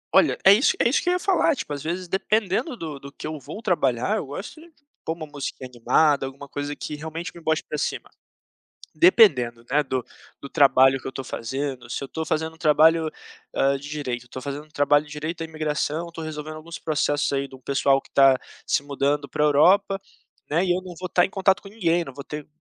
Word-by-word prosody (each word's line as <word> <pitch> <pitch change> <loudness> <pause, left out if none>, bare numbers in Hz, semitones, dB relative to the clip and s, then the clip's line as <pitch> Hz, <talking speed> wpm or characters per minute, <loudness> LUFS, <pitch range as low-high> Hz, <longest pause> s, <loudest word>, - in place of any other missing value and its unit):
Olha, - - +5
é 195 - +10
isso 250 - +3
é - - +4
isso 250 - +2
que - - -1
eu - - +3
ia 360 - 0
falar, 355 -4 +2
tipo, 150 - -5
às 145 - -5
vezes 175 +4 -3
dependendo 215 - 0
do 155 -6 -6
do 140 +1 -10
que - - -10
eu 155 0 -4
vou 205 - -9
trabalhar, 175 - +1
eu 155 - -4
gosto 195 - -8
de 335 +1 -16 0.3
pôr 160 - -2
uma 160 -2 -7
música 145 -3 -6
animada 135 +3 +2
alguma 140 +1 -10
coisa 145 +1 -4
que - - -6
realmente 160 +3 -6
me 170 - -12
bote 160 -1 0
pra 150 - -5
cima, - - -3 0.8
dependendo, 150 - +5
né, 150 +3 +3
do 130 -2 -2 0.4
do 140 - -8
trabalho 135 -1 +5
que - - -18
eu - - -4
estou 135 - -6
fazendo, 130 +1 -4
se - - -3
eu - - -5
estou 160 +3 -4
fazendo 160 +1 -2
um - - -21
trabalho, 160 +1 +4 0.5
hã, 140 0 +2
de 140 +2 -10
direito, 135 -5 -4
eu - - -22
estou 125 +2 -8
fazendo 140 +2 -5
um - - -26
trabalho 145 -1 +3
de 150 - -15
direito 155 +3 -5
à - - -2
imigração, 155 +1 -2
estou 165 -1 -8
resolvendo 155 0 -6
alguns 165 +2 -9
processos 145 -2 0
aí 140 0 -1
de - - -20
um 130 - -17
pessoal 135 +1 +2
que - - -22
tá 135 -1 +6 0.3
se - - +1
mudando 140 0 -1
pra 150 - 0
Europa, 195 +7 +4 0.5
né, 165 +5 +2
e 180 - +1
eu 185 - -2
não 180 -2 -10
vou 185 - -5
estar 175 0 +3
em 190 - 0
contato 195 0 +2
com 195 - -11
ninguém, 175 -5 +1
não 135 -5 -10
vou 140 - -7
ter 150 0 -7
150 Hz, 235 wpm, -24 LUFS, 140-170 Hz, 0.8 s, é